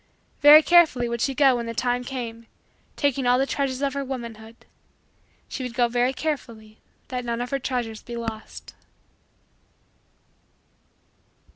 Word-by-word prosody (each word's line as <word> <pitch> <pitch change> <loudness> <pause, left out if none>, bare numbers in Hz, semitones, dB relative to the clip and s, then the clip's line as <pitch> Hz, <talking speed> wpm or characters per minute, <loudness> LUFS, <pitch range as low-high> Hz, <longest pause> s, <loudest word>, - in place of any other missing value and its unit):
Very 300 +2 +9
carefully 320 -9 +4
would 235 0 -3
she 270 +1 0
go 270 -2 +4
when 235 -1 -4
the 230 - -5
time 245 +1 0
came, 235 -3 -6 0.5
taking 275 -3 0
all 245 0 +4
the 270 - +1
treasures 275 -1 -2
of 275 -1 0
her 280 0 -3
womanhood. 230 -4 -7 0.9
She - - -6
would 250 -2 -6
go 240 -1 +3
very 245 +2 +1
carefully 230 -7 -5 0.3
that 250 -1 -4
none 235 -1 -3
of 245 0 -4
her 275 - -1
treasures 240 -4 -4
be 240 -1 -8
lost. 225 -2 -7
245 Hz, 145 wpm, -24 LUFS, 235-270 Hz, 0.9 s, Very